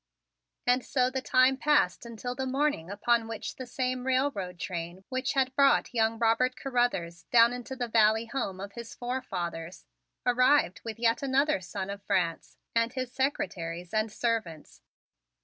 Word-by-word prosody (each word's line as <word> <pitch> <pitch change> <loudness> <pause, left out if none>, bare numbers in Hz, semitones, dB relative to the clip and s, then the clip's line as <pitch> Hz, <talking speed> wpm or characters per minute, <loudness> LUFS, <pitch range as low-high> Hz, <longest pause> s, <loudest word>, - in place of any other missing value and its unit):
And 250 +1 +3
so 255 -1 +1
the 265 0 -2
time 255 +1 +4
passed 260 - +2
until 235 +2 -5
the 265 +1 -3
morning 270 - 0
upon 225 +3 +1
which 225 -1 -6
the 255 - -7
same 255 +1 -2
railroad 255 -9 0
train 175 +1 -5
which 260 -1 -1
had 265 -1 +1
brought 275 -1 +3
young 225 -1 +2
Robert 235 +3 +2
Carruthers 240 -11 -1
down 235 0 +6
into 250 +2 -6
the 245 -2 -3
valley 220 0 +4
home 230 -7 -3
of 200 +1 -6
his 235 +1 -9
forefathers, 185 -9 -4 0.4
arrived 250 -5 +3
with 225 -1 -6
yet 230 0 +2
another 275 -3 +2
son 190 +2 -5
of 200 0 -7
France 170 -4 -1 0.2
and 230 0 +1
his 255 -2 -3
secretaries 180 -10 -2
and 215 0 +1
servants. 205 - -3
235 Hz, 155 wpm, -29 LUFS, 195-255 Hz, 0.4 s, down